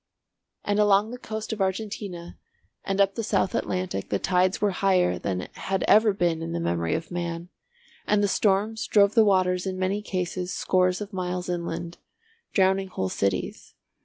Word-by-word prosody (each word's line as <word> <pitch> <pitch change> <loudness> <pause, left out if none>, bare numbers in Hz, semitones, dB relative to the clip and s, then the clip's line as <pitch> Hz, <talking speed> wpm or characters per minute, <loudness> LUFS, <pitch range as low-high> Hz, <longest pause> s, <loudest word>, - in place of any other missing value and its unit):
And 205 0 +1
along 210 +1 +4
the 250 - -7
coast 220 -1 -5
of 215 - -4
Argentina 190 -3 -3 0.5
and 195 0 -2
up 195 0 +4
the 230 - -3
South 190 -2 +1
Atlantic 185 - -2
the 100 - +1
tides 185 - +1
were 205 -1 +2
higher 185 -1 +2
than 95 -2 -2
had 190 -1 -2
ever 215 0 +6
been 175 -4 0
in 165 +1 -4
the 170 - -1
memory 85 - 0
of 160 +2 -5
man, 170 0 -4 0.6
and 205 -1 +3
the - - +3
storms 210 +2 +1
drove 200 -1 +4
the 225 - +6
waters 185 -2 +2
in 185 -1 -3
many 190 +2 -1
cases 185 -2 -3
scores 185 +1 +1
of 205 0 -6
miles 180 -1 -3
inland, 170 -1 -4 0.5
drowning 190 0 +2
whole 95 - -3
cities. 100 0 -2
185 Hz, 170 wpm, -26 LUFS, 175-205 Hz, 0.6 s, ever